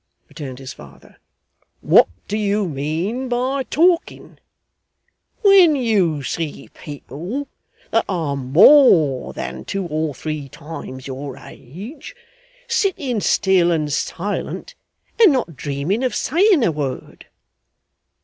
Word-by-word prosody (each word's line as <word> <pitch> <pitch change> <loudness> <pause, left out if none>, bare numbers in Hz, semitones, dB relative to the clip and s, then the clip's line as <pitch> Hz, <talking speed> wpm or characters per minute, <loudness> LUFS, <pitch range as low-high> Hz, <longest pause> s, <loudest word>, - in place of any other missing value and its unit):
returned 135 -4 -8
his 135 -1 -8
father, 70 -1 -16 0.6
'what - - +5 0.2
do 205 - -3
you 205 -1 0
mean 165 - -3
by 255 +3 -1
talking, 335 +6 0 1.0
when 385 -6 +7
you 195 - +1
see 150 -1 -5
people 165 - -7 0.4
that - - +2
are 165 -7 -1
more 150 - +5
than 65 0 -6
two 195 -1 -4
or 155 -3 -2
three 155 -2 -5
times 150 -4 -9
your 135 0 -7
age, 195 - -11 0.5
sitting 380 - 0
still 190 -3 +2
and 155 -4 0
silent 205 - -4 0.5
and 420 -7 +8
not 245 - -1
dreaming 145 - -2
of 255 - -1
saying 350 - +3
a 175 - +2
word? 140 -4 -6
170 Hz, 110 wpm, -20 LUFS, -, 1.0 s, and